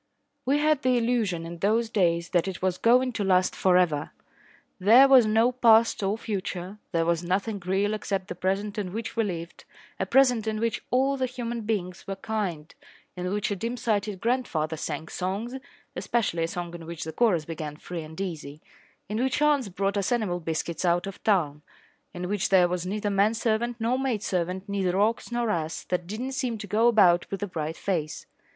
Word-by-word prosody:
We 280 Hz, +2 st, +3 dB
had 300 Hz, -1 st, +2 dB
the 255 Hz, -2 st, +2 dB
illusion 225 Hz, -8 st, 0 dB
in 170 Hz, 0 st, -8 dB
those 225 Hz, +5 st, +2 dB
days 170 Hz, -3 st, +1 dB
that 175 Hz, +1 st, +1 dB
it 190 Hz, -2 st, -4 dB
was 185 Hz, -1 st, -1 dB
going 250 Hz, +2 st, +4 dB
to 220 Hz, -3 st, -3 dB
last 185 Hz, -1 st, +2 dB
for 185 Hz, -1 st, +3 dB
ever. 155 Hz, -5 st, +1 dB, 0.7 s
There 235 Hz, +8 st, +7 dB
was 260 Hz, -4 st, +7 dB
no 225 Hz, +3 st, +3 dB
past 230 Hz, -3 st, +4 dB
or 200 Hz, +2 st, 0 dB
future. 195 Hz, -2 st, -5 dB
There 165 Hz, -2 st, +1 dB
was 170 Hz, 0 st, +1 dB
nothing 195 Hz, +3 st, -1 dB
real 195 Hz, +3 st, +1 dB
except 195 Hz, -3 st, -3 dB
the -, -, -4 dB
present 195 Hz, +4 st, -2 dB
in 185 Hz, -3 st, -4 dB
which 225 Hz, +1 st, -5 dB
we 230 Hz, -, +2 dB
lived 170 Hz, -4 st, -5 dB, 0.4 s
a -, -, -1 dB
present 250 Hz, -5 st, +4 dB
in 215 Hz, -1 st, -1 dB
which 230 Hz, 0 st, -1 dB
all 270 Hz, +2 st, +2 dB
the 260 Hz, -1 st, 0 dB
human 240 Hz, -2 st, -4 dB
beings 195 Hz, -5 st, -3 dB
were 195 Hz, -, -3 dB
kind, 190 Hz, -7 st, -4 dB, 0.4 s
in 180 Hz, 0 st, -3 dB
which 210 Hz, +1 st, -1 dB
a -, -, 0 dB
dim 230 Hz, +6 st, -3 dB
sighted 210 Hz, -4 st, -1 dB
grandfather 200 Hz, -11 st, 0 dB
sang 155 Hz, 0 st, -4 dB
songs 195 Hz, +9 st, -3 dB, 0.4 s
(especially 200 Hz, -8 st, 0 dB
a -, -, -3 dB
song 175 Hz, 0 st, -5 dB
in 165 Hz, -1 st, -9 dB
which 170 Hz, -1 st, -6 dB
the 160 Hz, -, -6 dB
chorus 190 Hz, -10 st, +2 dB
began 155 Hz, -2 st, -5 dB
"Free 170 Hz, +1 st, -6 dB
and 160 Hz, +2 st, -10 dB
easy"), 155 Hz, -6 st, -5 dB, 0.5 s
in 215 Hz, +3 st, -2 dB
which 265 Hz, +1 st, 0 dB
aunts 295 Hz, -6 st, +2 dB
brought 195 Hz, +2 st, -1 dB
us 200 Hz, +2 st, -1 dB
animal 210 Hz, -7 st, 0 dB
biscuits 165 Hz, +1 st, -3 dB
out 175 Hz, 0 st, +2 dB
of 195 Hz, -1 st, -8 dB
town, 155 Hz, -9 st, +1 dB, 0.5 s
in 180 Hz, 0 st, -5 dB
which 205 Hz, -1 st, -1 dB
there 185 Hz, -2 st, +5 dB
was 180 Hz, 0 st, -3 dB
neither 205 Hz, +1 st, -2 dB
man 200 Hz, +3 st, +3 dB
servant 235 Hz, +1 st, 0 dB
nor 235 Hz, +3 st, 0 dB
maid 250 Hz, -6 st, -1 dB
servant, 185 Hz, +2 st, -2 dB
neither 195 Hz, -2 st, 0 dB
ox 220 Hz, +3 st, +1 dB
nor 240 Hz, -2 st, 0 dB
ass, 160 Hz, -3 st, -3 dB
that 180 Hz, -1 st, -1 dB
did 215 Hz, +5 st, -5 dB
not 265 Hz, +1 st, -3 dB
seem 255 Hz, -3 st, -2 dB
to 210 Hz, -, -7 dB
go 215 Hz, +4 st, +2 dB
about 185 Hz, -7 st, +4 dB
with 195 Hz, +1 st, -4 dB
a -, -, -1 dB
bright 160 Hz, -2 st, -4 dB
face. 160 Hz, -6 st, -3 dB
200 Hz, 200 wpm, -26 LUFS, 175-230 Hz, 0.7 s, There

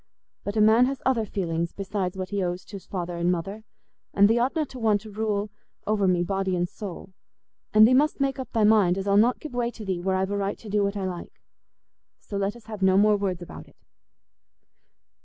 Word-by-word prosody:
But 205 Hz, +2 st, -4 dB
a -, -, +4 dB
man 220 Hz, +4 st, +6 dB
has 270 Hz, 0 st, -3 dB
other 235 Hz, -5 st, +1 dB
feelings 170 Hz, -4 st, -2 dB
besides 195 Hz, -2 st, -3 dB
what 185 Hz, -1 st, -4 dB
he 200 Hz, -1 st, -1 dB
owes 180 Hz, 0 st, -3 dB
to's 200 Hz, -3 st, -10 dB
father 175 Hz, -2 st, -4 dB
and 170 Hz, +1 st, +1 dB
mother, 195 Hz, +5 st, -4 dB, 0.5 s
and 200 Hz, 0 st, +6 dB
thee 225 Hz, +2 st, +2 dB
oughtna 275 Hz, +6 st, 0 dB
to 255 Hz, -, -9 dB
want 215 Hz, -3 st, +2 dB
to 215 Hz, 0 st, -11 dB
rule 210 Hz, -1 st, -2 dB, 0.3 s
over 205 Hz, -2 st, +1 dB
me 180 Hz, -1 st, +2 dB
body 190 Hz, +1 st, -1 dB
and 175 Hz, 0 st, 0 dB
soul. 190 Hz, -1 st, -9 dB, 0.6 s
And 215 Hz, +1 st, +7 dB
thee 255 Hz, -, +3 dB
must 295 Hz, +4 st, +3 dB
make 275 Hz, -1 st, 0 dB
up 260 Hz, -, -6 dB
thy 225 Hz, -, +1 dB
mind 205 Hz, -4 st, +4 dB
as 195 Hz, +1 st, -3 dB
I'll 200 Hz, -, +3 dB
not 230 Hz, +5 st, +4 dB
give 305 Hz, -, -8 dB
way 240 Hz, -1 st, 0 dB
to 225 Hz, -3 st, -10 dB
thee 185 Hz, -3 st, -2 dB
where 190 Hz, +1 st, 0 dB
I've 190 Hz, +1 st, -1 dB
a 205 Hz, -, -1 dB
right 200 Hz, 0 st, -2 dB
to 220 Hz, -, -11 dB
do 205 Hz, 0 st, +1 dB
what 200 Hz, +1 st, -1 dB
I 195 Hz, -, -2 dB
like. 180 Hz, -2 st, -7 dB, 0.8 s
So 205 Hz, -, -9 dB
let 200 Hz, +2 st, -1 dB
us 235 Hz, -2 st, -15 dB
have 215 Hz, -2 st, -8 dB
no 190 Hz, 0 st, +4 dB
more 210 Hz, +1 st, +5 dB
words 190 Hz, -3 st, -2 dB
about -, -, -11 dB
it." -, -, -22 dB
200 Hz, 230 wpm, -25 LUFS, 190-220 Hz, 0.8 s, And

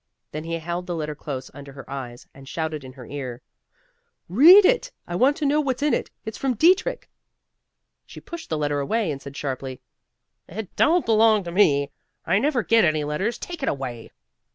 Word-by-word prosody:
Then 155 Hz, +1 st, -6 dB
he 165 Hz, -, -4 dB
held 170 Hz, +2 st, -5 dB
the 175 Hz, -, -3 dB
letter 155 Hz, -2 st, -3 dB
close 135 Hz, -3 st, -7 dB
under 140 Hz, -1 st, -11 dB
her 135 Hz, -1 st, -11 dB
eyes, 130 Hz, -3 st, -7 dB
and 135 Hz, 0 st, -13 dB
shouted 160 Hz, -3 st, -3 dB
in 130 Hz, 0 st, -10 dB
her 130 Hz, -2 st, -11 dB
ear, 130 Hz, -3 st, -7 dB, 0.8 s
"Read 330 Hz, -, +8 dB
it! -, -, +2 dB, 0.2 s
I 175 Hz, -, -4 dB
want 265 Hz, +9 st, +3 dB
to 305 Hz, -, -2 dB
know 295 Hz, +2 st, +3 dB
what's 270 Hz, -1 st, -2 dB
in 300 Hz, -, +2 dB
it. -, -, -1 dB, 0.2 s
It's 220 Hz, -, -6 dB
from 265 Hz, -2 st, 0 dB
Dietrich." 370 Hz, -, +2 dB, 1.0 s
She -, -, -11 dB
pushed 340 Hz, -1 st, -9 dB
the 160 Hz, -, -1 dB
letter 145 Hz, -1 st, -1 dB
away 205 Hz, +6 st, 0 dB
and 135 Hz, -1 st, -6 dB
said 140 Hz, 0 st, -10 dB
sharply, 130 Hz, -2 st, -4 dB, 0.7 s
"It 205 Hz, +2 st, -7 dB
don't 345 Hz, +2 st, +3 dB
belong 220 Hz, -2 st, +4 dB
to 170 Hz, -, -6 dB
me. 145 Hz, -7 st, +3 dB, 0.3 s
I 195 Hz, -, +2 dB
never 265 Hz, -2 st, +1 dB
get 230 Hz, +1 st, +4 dB
any 155 Hz, -3 st, +2 dB
letters. 170 Hz, +11 st, -2 dB
Take 345 Hz, -3 st, -7 dB
it 270 Hz, -, 0 dB
away." 125 Hz, -5 st, -5 dB
170 Hz, 195 wpm, -24 LUFS, -, 1.0 s, Read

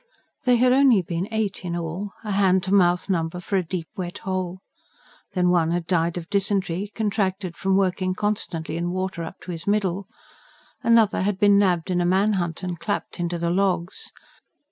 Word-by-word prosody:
They 250 Hz, -1 st, +5 dB
had 250 Hz, +1 st, +4 dB
only 260 Hz, -8 st, +5 dB
been 175 Hz, +2 st, -3 dB
eight 220 Hz, -4 st, -2 dB
in 175 Hz, -1 st, -3 dB
all 170 Hz, +5 st, -4 dB
a 210 Hz, -, -4 dB
hand 190 Hz, -2 st, +3 dB
to 190 Hz, +1 st, -1 dB
mouth 180 Hz, -2 st, +3 dB
number 170 Hz, -2 st, -1 dB
for 180 Hz, +3 st, -3 dB
a 185 Hz, -, +1 dB
deep 165 Hz, -1 st, -4 dB
wet 180 Hz, +1 st, -5 dB
hole. 185 Hz, -1 st, -2 dB, 0.8 s
Then, 180 Hz, -1 st, +2 dB
one 170 Hz, -2 st, +3 dB
had 170 Hz, 0 st, -1 dB
died 170 Hz, -1 st, +1 dB
of 170 Hz, -1 st, -6 dB
dysentery, 195 Hz, -1 st, 0 dB
contracted 195 Hz, -4 st, -1 dB
from 190 Hz, +2 st, +1 dB
working 185 Hz, -1 st, 0 dB
constantly 185 Hz, -6 st, -2 dB
in 175 Hz, +1 st, -1 dB
water 185 Hz, -1 st, -3 dB
up 165 Hz, +3 st, -8 dB
to 180 Hz, -, -7 dB
his 165 Hz, 0 st, -6 dB
middle; 200 Hz, -2 st, 0 dB, 0.7 s
another 230 Hz, -3 st, +4 dB
had 200 Hz, 0 st, 0 dB
been 205 Hz, 0 st, +5 dB
nabbed 185 Hz, -3 st, +1 dB
in 180 Hz, -1 st, +1 dB
a -, -, +1 dB
manhunt 185 Hz, -3 st, +1 dB
and 175 Hz, -2 st, -4 dB
clapped 205 Hz, -1 st, -3 dB
into 175 Hz, 0 st, -1 dB
the 170 Hz, 0 st, -1 dB
"logs." 185 Hz, -, -1 dB
185 Hz, 185 wpm, -24 LUFS, 175-200 Hz, 0.8 s, They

